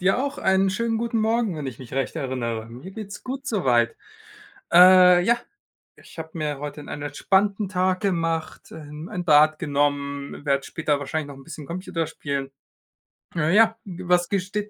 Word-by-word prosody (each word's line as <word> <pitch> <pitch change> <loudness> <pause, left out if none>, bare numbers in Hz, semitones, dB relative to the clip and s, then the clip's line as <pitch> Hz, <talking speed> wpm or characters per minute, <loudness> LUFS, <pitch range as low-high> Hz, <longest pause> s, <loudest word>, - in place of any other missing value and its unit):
Dir 190 +1 +3
auch 280 +2 -2
einen 190 0 +2
schönen 225 +4 -1
guten 230 0 -1
Morgen, 220 -4 +1
wenn 150 -2 -5
ich 130 -3 -7
mich 130 -3 -11
recht 135 -1 -2
erinnere. 120 -4 -3
Mir 125 +11 -10
geht's 205 0 -8
gut 270 +2 -6
so 210 - -1
weit. 120 -2 +3 0.8
Äh, 180 0 +8
ja, 235 +5 +3 0.6
ich - - -14
habe 160 0 -6
mir 150 -3 -3
heute 150 +1 -6
'n 145 - -11
einen 145 - -6
entspannten 195 +8 +1
Tag 185 0 0
gemacht, 165 -5 -2
ähm, 150 +2 -9
ein 180 -4 -4
Bad 155 0 +5
genommen, 140 0 -2
werde 140 -1 +1
später 150 -3 -1
wahrscheinlich 145 +1 -3
noch 140 - -9
'n 135 - -13
bisschen 155 0 -9
Computer 170 0 -3
spielen. 140 -3 -4 0.8
Äh, 165 +1 +1
ja, 225 +1 +5
g 185 -2 -8
was 175 0 +3
ge 200 - +1
steht 205 +3 -4
165 Hz, 185 wpm, -24 LUFS, 145-195 Hz, 0.8 s, Äh